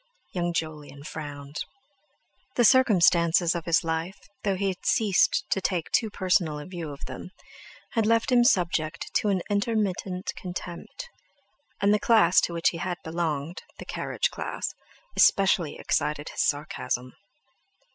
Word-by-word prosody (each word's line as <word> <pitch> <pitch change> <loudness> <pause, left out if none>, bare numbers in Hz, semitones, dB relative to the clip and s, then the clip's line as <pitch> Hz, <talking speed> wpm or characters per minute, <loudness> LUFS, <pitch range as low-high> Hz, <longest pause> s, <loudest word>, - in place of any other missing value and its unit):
Young 175 -1 -1
Jolyon 155 -4 -5
frowned. 145 -2 -7 1.0
The 240 - +4
circumstances 180 -8 +5
of 170 -2 -4
his 170 -1 +3
life, 165 +3 -2 0.3
though 195 -2 +1
he 195 +1 0
had 185 - -6
ceased 210 -5 +3
to 195 - +1
take 180 -3 -1
a - - -42
too 225 - +2
personal 175 -6 0
view 175 -4 -6
of 140 - -8
them, - - -8 0.6
had 225 -2 +1
left 230 +2 +2
him 245 -1 +6
subject 165 - +1
to 210 - 0
an 190 -3 0
intermittent 200 -3 -1
contempt; 180 - -7 0.7
and 200 +1 +3
the 210 - +3
class 215 -8 +5
to 170 - -2
which 170 0 +2
he 170 - -6
had 175 0 -2
belonged—the 160 -1 -4
carriage - - -2
class—especially 195 - 0
excited 150 0 -1
his - - -2
sarcasm. 145 -4 -2
175 Hz, 135 wpm, -26 LUFS, 160-200 Hz, 1.0 s, him